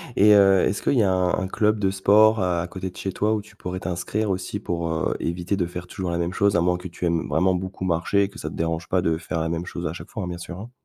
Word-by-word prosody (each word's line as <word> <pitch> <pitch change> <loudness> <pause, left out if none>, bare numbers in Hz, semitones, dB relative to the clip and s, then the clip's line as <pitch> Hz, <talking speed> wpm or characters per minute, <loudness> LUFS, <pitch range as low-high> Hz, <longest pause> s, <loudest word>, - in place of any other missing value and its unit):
et 105 +1 +6
heu, 95 -2 +6
est-ce 100 - 0
qu'il - - +1
y 120 -5 +4
a 95 - +2
un 90 -1 +1
un 95 - -2
club 105 +3 +1
de 95 -2 +1
sport 105 +3 +5
à 90 -2 0
côté 95 +2 -5
de - - -15
chez 95 - -3
toi 105 +3 +1
où 105 - -2
tu 105 - -18
pourrais 90 -2 -5
t'inscrire 95 +4 -2
aussi 95 0 -3
pour, 85 -1 -3
heu, 80 0 -1
éviter 85 +3 -2
de 90 -3 -1
faire 90 +1 -7
toujours 90 0 -5
la 85 - -1
même 85 +1 -1
chose 100 +2 +2
à 85 - +3
moins 90 +1 +2
que 90 - -7
tu 90 0 -5
aimes 85 -1 0
vraiment 90 +3 +2
beaucoup 95 +1 -4
marcher, 95 +3 +1
que 105 +4 -12
ça 80 - -4
te - - -9
dérange 80 0 -2
pas 90 -1 +1
de 80 -2 +1
faire 85 0 -3
la 80 0 -1
même 85 +1 -3
chose 85 - -5
à 80 - -2
chaque 85 - -10
fois, 110 - -5
hein, - - -4
bien 90 -1 -5
sûr, 85 +1 -7
hein? 115 +4 -9
90 Hz, 305 wpm, -24 LUFS, 85-100 Hz, -, et